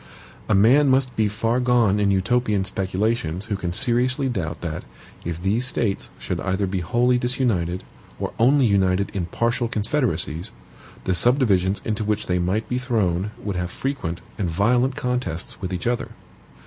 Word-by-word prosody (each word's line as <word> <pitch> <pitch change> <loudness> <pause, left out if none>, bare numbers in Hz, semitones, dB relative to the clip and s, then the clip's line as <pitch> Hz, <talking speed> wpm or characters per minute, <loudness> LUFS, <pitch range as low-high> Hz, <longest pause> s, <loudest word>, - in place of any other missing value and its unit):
A 105 - +4
man 130 +9 +5
must 130 -1 +2
be 110 -1 +2
far 115 +4 0
gone 120 -5 +3
in 100 -1 +2
Utopian 105 +1 +1
speculations 95 -1 -1
who 110 -3 -2
can 90 -3 -3
seriously 125 +7 +2
doubt 95 -10 -3
that, 80 -3 -4 0.4
if 85 -1 -4
these 105 +7 0
States 110 -5 -1
should - - -4
either 95 +1 0
be 95 0 -2
wholly 120 +8 +2
disunited, 115 -9 0 0.4
or - - -3
only 135 +3 +5
united 95 -2 +2
in 90 -4 -2
partial 120 +6 0
confederacies, 105 - -1 0.5
the 95 - 0
subdivisions 100 -3 +3
into 110 -1 -1
which 105 0 -1
they 90 -1 0
might 95 +5 0
be 125 - -1
thrown 105 -7 0
would 100 -3 -3
have 90 -1 -2
frequent 90 -10 -3 0.2
and 95 -4 0
violent 120 +9 +2
contests 125 -12 -3
with 95 -1 -3
each 90 -2 -4
other. 120 0 -1
105 Hz, 160 wpm, -23 LUFS, 95-125 Hz, 0.5 s, man